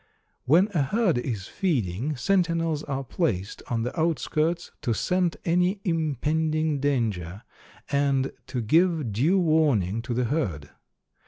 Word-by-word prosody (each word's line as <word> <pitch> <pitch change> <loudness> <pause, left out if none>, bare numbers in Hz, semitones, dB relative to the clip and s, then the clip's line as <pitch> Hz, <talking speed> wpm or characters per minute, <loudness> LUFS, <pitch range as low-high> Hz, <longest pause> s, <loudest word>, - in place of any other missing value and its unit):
When 165 +9 +5
a 160 - +2
herd 180 - +1
is 115 -7 -4
feeding, 135 - -1
sentinels 165 0 +1
are 135 -1 -3
placed 110 - -2
on 115 -2 -1
the 125 - -4
outskirts 165 +1 0
to 120 -6 0
scent 180 - 0
any 180 +4 +2
impending 155 - 0
danger, 110 -9 -1 0.5
and 140 -1 +1 0.2
to 125 - -3
give 160 0 +2
due 150 - +2
warning 145 - +2
to 120 0 -4
the 125 - +1
herd. 105 - -2
145 Hz, 130 wpm, -26 LUFS, 120-165 Hz, 0.5 s, When